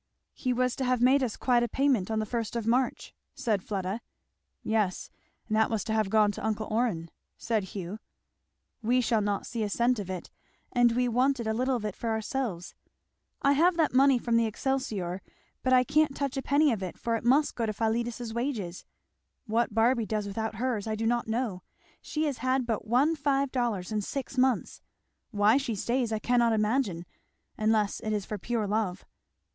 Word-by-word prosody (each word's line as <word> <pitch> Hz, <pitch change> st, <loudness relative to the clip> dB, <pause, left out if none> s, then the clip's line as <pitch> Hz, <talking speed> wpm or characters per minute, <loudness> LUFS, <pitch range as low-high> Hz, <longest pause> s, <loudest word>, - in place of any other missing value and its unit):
"He 255 Hz, -, -2 dB
was 250 Hz, 0 st, +1 dB
to 270 Hz, -, -1 dB
have 250 Hz, -1 st, +1 dB
made 260 Hz, +3 st, +5 dB
us 245 Hz, -5 st, -2 dB
quite 245 Hz, -2 st, +3 dB
a 240 Hz, -, +1 dB
payment 255 Hz, -5 st, +1 dB
on 220 Hz, -, -1 dB
the 215 Hz, -, 0 dB
first 230 Hz, +1 st, -3 dB
of 230 Hz, -2 st, -2 dB
March," 250 Hz, +3 st, 0 dB, 0.2 s
said 225 Hz, -7 st, 0 dB
Fleda. 195 Hz, +2 st, -3 dB, 0.6 s
"Yes, 210 Hz, -4 st, -1 dB, 0.4 s
and 215 Hz, -, -1 dB
that 220 Hz, 0 st, +3 dB
was 220 Hz, -2 st, -1 dB
to 220 Hz, -, -2 dB
have 215 Hz, -3 st, +1 dB
gone 210 Hz, 0 st, +4 dB
to -, -, -8 dB
uncle 215 Hz, 0 st, -1 dB
Orrin," 215 Hz, -8 st, 0 dB, 0.3 s
said 220 Hz, -4 st, -1 dB
Hugh. 190 Hz, +2 st, -6 dB, 0.8 s
"We 240 Hz, +3 st, +2 dB
shall 230 Hz, -3 st, +2 dB
not 205 Hz, -1 st, -1 dB
see 235 Hz, -2 st, -4 dB
a 210 Hz, -, 0 dB
cent 235 Hz, +3 st, +1 dB
of 195 Hz, -2 st, -5 dB
it. 185 Hz, -2 st, -6 dB, 0.4 s
And 240 Hz, -1 st, +4 dB
we 250 Hz, +1 st, +1 dB
wanted 250 Hz, +1 st, +1 dB
a 220 Hz, -, 0 dB
little 255 Hz, +3 st, +1 dB
of 225 Hz, -3 st, -3 dB
it 210 Hz, -, -3 dB
for 230 Hz, -, -3 dB
ourselves. 220 Hz, -5 st, -3 dB, 0.7 s
I 280 Hz, -, +5 dB
have 335 Hz, +5 st, +3 dB
that 320 Hz, -5 st, +2 dB
money 270 Hz, 0 st, +5 dB
from 235 Hz, -1 st, +1 dB
the 230 Hz, -1 st, +3 dB
Excelsior, 215 Hz, -7 st, -2 dB, 0.4 s
but 255 Hz, -, 0 dB
I 255 Hz, -1 st, +6 dB
can't 300 Hz, +2 st, +2 dB
touch 280 Hz, -1 st, -2 dB
a 270 Hz, -, -1 dB
penny 285 Hz, +2 st, +3 dB
of 215 Hz, -4 st, -2 dB
it 185 Hz, -2 st, -5 dB
for 230 Hz, -1 st, -1 dB
it 225 Hz, -, -3 dB
must 275 Hz, +5 st, +3 dB
go 230 Hz, -2 st, -2 dB
to -, -, 0 dB
Philetus's 230 Hz, +1 st, -2 dB
wages. 230 Hz, -8 st, -3 dB, 0.6 s
What 225 Hz, -1 st, 0 dB
Barby 230 Hz, 0 st, +3 dB
does 215 Hz, -1 st, -1 dB
without 220 Hz, +2 st, -3 dB
hers 230 Hz, -2 st, -2 dB
I 220 Hz, -, -1 dB
do 225 Hz, +1 st, -3 dB
not 240 Hz, 0 st, +1 dB
know 220 Hz, -5 st, -2 dB, 0.4 s
she 310 Hz, -, -2 dB
has 285 Hz, -6 st, -1 dB
had 255 Hz, +1 st, +1 dB
but 225 Hz, -2 st, -2 dB
one 270 Hz, +8 st, +3 dB
five 280 Hz, -2 st, 0 dB
dollars 230 Hz, -7 st, -1 dB
in 215 Hz, -1 st, 0 dB
six 270 Hz, +6 st, -5 dB
months. 260 Hz, -1 st, +1 dB, 0.5 s
Why 210 Hz, +2 st, +4 dB
she 265 Hz, -5 st, -2 dB
stays 235 Hz, +3 st, -1 dB
I 220 Hz, -, 0 dB
cannot 235 Hz, +1 st, +2 dB
imagine; 215 Hz, -5 st, 0 dB, 0.5 s
unless 215 Hz, -1 st, +1 dB
it 215 Hz, -1 st, -3 dB
is 205 Hz, -2 st, -2 dB
for 210 Hz, -, -5 dB
pure 230 Hz, +2 st, -1 dB
love." 205 Hz, -3 st, -1 dB
230 Hz, 200 wpm, -28 LUFS, 215-255 Hz, 0.8 s, I